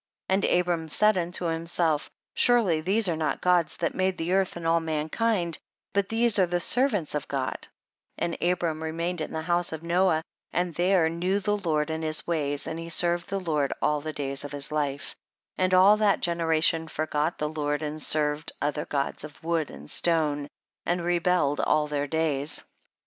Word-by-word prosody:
19. 190 +1 +2
And 175 - +4
Abram 170 -2 -2
said 210 +7 +3
unto 175 0 -1
himself, 165 -2 0 0.2
surely 215 -10 +3
these 200 +6 +2
are 170 - 0
not 155 -1 -1
gods 180 -2 +2
that 170 - -1
made 185 0 0
the 165 +3 -2
earth 195 -1 +1
and 170 -1 -7
all 165 0 +3
mankind, 165 +4 -1 0.3
but 200 -1 0
these 225 -1 +4
are 185 - +4
the 175 +1 0
servants 215 - +4
of 150 -2 -3
God; 135 -2 -3 0.5
and 170 - -2
Abrani 170 -3 0
remained 165 +2 -3
in - - -4
the 160 0 -4
house 175 +1 0
of 160 0 -6
Noah 170 -1 +2 0.3
and 175 -1 -1
there 175 0 +3
knew 180 +4 -1
the 205 +1 0
Lord 160 -6 -1
and 160 0 -3
his 155 0 +1
ways, 145 -4 -1
and 160 - -5
he 165 0 -7
served 175 +1 +1
the 195 - -1
Lord 150 -6 -1
all 150 -1 +1
the 155 +1 -4
days 140 -2 -3
of 145 - -7
his 145 +1 -1
life, 145 -2 -2 0.4
and 185 0 +1
all 190 +3 +6
that 210 -2 +2
generation 165 -1 +1
forgot 155 +1 -2
the 150 - -1
Lord, 145 -1 -2
and 155 +1 -4
served 150 +1 0
other 150 +1 -2
gods 140 0 -2
of 150 0 -11
wood 165 -2 -1
and 75 +2 -11
stone, 150 - 0 0.4
and 175 0 -1
rebel 175 -3 +2
led 145 - -5
all 155 0 +2
their 145 -1 -2
days. 150 -1 -1
165 Hz, 190 wpm, -26 LUFS, 150-180 Hz, 0.5 s, all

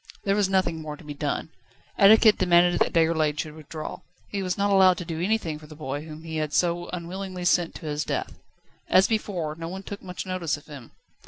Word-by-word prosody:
There 195 0 +2
was 205 -2 +2
nothing 180 -4 +1
more 150 -1 -6
to - - -15
be 150 -1 -7
done. 145 +2 -3 0.5
Etiquette 215 +2 +6
demanded 175 -1 +4
that - - +2
Déroulède 160 -2 +2
should 150 0 -4
withdraw. 155 0 -7 0.3
He 200 - -3
was 185 -1 -2
not 200 0 +1
allowed 190 -2 +6
to 175 - -5
do 165 0 -4
anything 180 -6 0
for 155 - -13
the 155 - -12
boy 145 0 -5
whom 155 0 -9
he 160 -1 -5
had 155 -1 -2
so 175 0 +1
unwillingly 180 +1 -5
sent 175 -1 +2
to 165 - -9
his 150 0 -2
death. - - -4 0.5
As 185 +1 +6
before, 190 -8 -2
no 165 +1 -7
one 190 +3 -6
took 200 +1 -7
much 180 -1 -6
notice 185 -5 -2
of 145 - -16
him. 140 -6 -11
170 Hz, 220 wpm, -26 LUFS, 155-190 Hz, 0.5 s, Etiquette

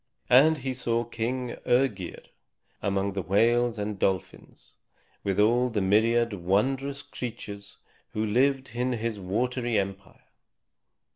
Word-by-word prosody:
And 150 +6 +7
he 135 -1 -3
saw 120 -2 0
King 120 +2 -3
Œgir, 120 -8 0 0.6
among 100 0 0
the 95 - -2
whales 115 +5 +2
and 105 -1 -4
dolphins, 95 -2 -3 0.5
with 100 0 -1
all 120 +4 +4
the 110 -3 -1
myriad 115 +4 +3
wondrous 130 +10 0
creatures 105 -5 -7 0.4
who 110 +1 -1
lived 130 +5 +1
in 125 +1 0
his 115 -2 -3
watery 120 +5 -1
empire. 100 -1 -4
115 Hz, 120 wpm, -27 LUFS, 100-125 Hz, 0.6 s, And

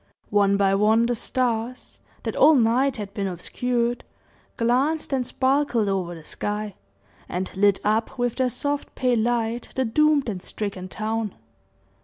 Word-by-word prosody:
One 200 -1 +3
by 195 -1 +3
one, 215 +3 +4
the 245 - +1
stars 240 0 -2 0.2
that - - -3
all 315 - +6
night 250 +2 +2
had 200 -2 -6
been 200 -2 -2
obscured, 240 +6 -2 0.5
glanced 270 +6 +1
and 255 -2 0
sparkled 260 -4 +1
over 185 -3 -1
the 160 -2 -12
sky, 210 +3 -4 0.6
and 185 +2 -4
lit 200 0 +3
up 220 +4 0
with 245 -1 -1
their 260 -1 +2
soft, 285 +4 -3
pale 250 -2 +2
light 235 0 -1
the 260 - +1
doomed 300 +4 +3
and 195 -5 -3
stricken 195 -2 -5
town. 215 +1 -3
225 Hz, 150 wpm, -24 LUFS, 205-250 Hz, 0.6 s, all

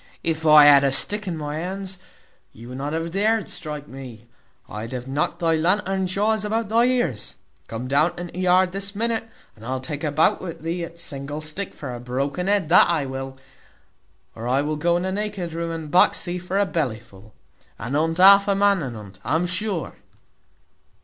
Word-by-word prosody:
If 160 -1 -1
I 150 -1 +9
had 140 -1 +8
a 135 - +3
stick 210 +9 +2
in 170 -3 -3
my 150 0 -4
hand, 190 +3 -4 0.6
you 120 +2 -12
would 130 +1 -7
not 145 +2 -3
have 165 +1 -3
dared 215 +3 +1
strike 150 -2 -6
me. 125 -4 -10 0.4
I'd 110 +4 -7
have 125 0 -5
knocked 145 +5 -1
thy 165 -2 +1
lantern 190 +3 +1
jaws 210 +3 0
about 220 0 -1
thy 230 +2 +4
ears. 245 - -1 0.3
Come 115 +3 -5
down 145 +6 +2
into 175 +1 -7
yard 185 0 +3
this 195 +1 -4
minute, 225 +1 -1 0.3
and 110 - -16
I'll 130 +2 -3
take 145 +3 -6
a 150 - 0
bout 160 +8 +2
with 170 -5 -7
thee 170 +1 -2
at 170 0 -8
single 145 -2 -4
stick 155 +6 -5
for 135 -5 -6
a 120 - -6
broken 140 +8 -3
head, 200 -5 +1
that 175 - +6
I 160 -5 +1
will; 135 0 -6 1.0
or 115 +1 -7
I 135 +3 +2
will 155 +1 -2
go 170 +3 +1
into 185 +2 -2
naked 200 -4 -3
room 165 0 -3
and 160 -2 -6
box 180 - +4
thee 175 0 -4
for 180 +2 -3
a 200 - +3
belly 145 - -2
full. 110 -2 -18 0.4
At 120 +4 -5
unt 165 +3 +1
half 200 +2 +7
a 200 - +2
man, 200 -2 +3
at 130 -5 -5
unt, 100 -3 -11
I'm 165 +2 0
sure." 185 -1 -2
165 Hz, 200 wpm, -23 LUFS, 140-190 Hz, 1.0 s, I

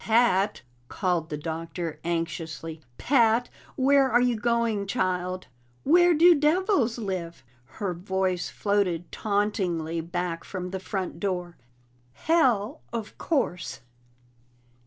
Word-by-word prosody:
"Pat!" 220 - +3 0.2
called 175 -2 -1
the 150 - -3
Doctor 165 +1 -5
anxiously. 165 -1 -4 0.2
"Pat! 240 -2 +3 0.3
Where 275 0 +4
are 240 - +4
you 245 -1 +2
going, 230 -3 0
child?" 185 -1 -1 0.4
"Where 350 +3 +5
do 345 +3 +7
devils 300 - +2
live?" 185 - -4 0.3
Her 200 -4 -2
voice 185 0 -1
floated 185 -5 0
tauntingly 185 -6 -1
back 170 0 -3
from 180 -2 -6
the 190 - -3
front 190 -2 -4
door. 180 -2 -2 0.6
"Hell, 250 -11 +1
of 225 -2 -5
course!" 260 - -1
195 Hz, 110 wpm, -26 LUFS, 175-235 Hz, 0.6 s, do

